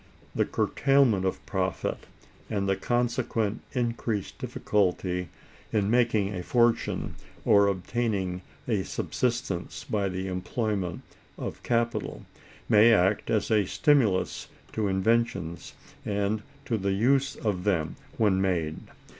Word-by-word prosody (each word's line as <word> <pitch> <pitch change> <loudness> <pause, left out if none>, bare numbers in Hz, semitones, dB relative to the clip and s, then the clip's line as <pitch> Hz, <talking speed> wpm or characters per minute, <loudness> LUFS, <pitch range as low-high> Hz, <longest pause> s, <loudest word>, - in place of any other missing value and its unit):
The - - +2
curtailment 135 -9 +2
of 95 - -2
profit, 95 -1 -2 0.4
and 100 -3 -1
the 95 - +2
consequent 115 -2 0
increased 115 -4 -2
difficulty 90 -3 0 0.4
in 105 -1 +1
making 115 -4 +2
a 90 - -3
fortune 120 +4 +1 0.3
or 100 -1 +6
obtaining 95 -2 -1 0.3
a 110 -5 +1
subsistence 115 -3 -2
by 100 -2 -1
the 95 +1 -3
employment 95 -1 -2 0.3
of - - -5
capital, 115 -2 -1 0.4
may 110 +2 +7
act 100 -1 +3
as 110 +1 +1
a 105 -2 +4
stimulus 130 -12 +2 0.3
to 110 -2 0
inventions, 95 -3 0 0.3
and 105 +1 0 0.2
to 115 -4 -1
the 100 0 0
use 135 +6 +2
of 100 -5 -2
them 85 -6 0 0.2
when 100 -4 +3
made. 85 -5 0
105 Hz, 115 wpm, -27 LUFS, 95-115 Hz, 0.4 s, may